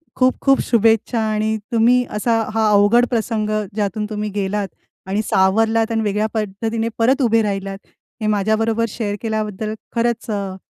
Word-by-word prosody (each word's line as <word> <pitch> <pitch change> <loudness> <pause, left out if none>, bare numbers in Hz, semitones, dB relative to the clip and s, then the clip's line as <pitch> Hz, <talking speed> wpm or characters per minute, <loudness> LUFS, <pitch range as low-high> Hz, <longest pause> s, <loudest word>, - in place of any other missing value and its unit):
खूप-खूप 265 +1 +2
शुभेच्छा 225 0 +2
आणि 215 0 0 0.2
तुम्ही 240 +2 +4
असा 225 +2 +1 0.2
हा 220 -1 +2
अवघड 205 +4 +5
प्रसंग 220 -2 -1 0.3
ज्यातून 210 0 -1
तुम्ही 210 0 -3
गेलात 200 0 -1 0.4
आणि 200 +3 0
सावरलात 225 +5 +2
आणि 225 -1 0
वेगळ्या 210 +1 0
पद्धतीने 225 +2 -2
परत 260 +5 +2
उभे 230 -2 +3
राहिलात. 195 -2 -3 0.4
हे 215 - -1
माझ्याबरोबर 220 +2 +1
शेअर 205 -1 -3
केल्याबद्दल 215 -1 -3 0.2
खरंच 235 0 -1
अ, 200 -2 -3
220 Hz, 140 wpm, -19 LUFS, 205-230 Hz, 0.4 s, अवघड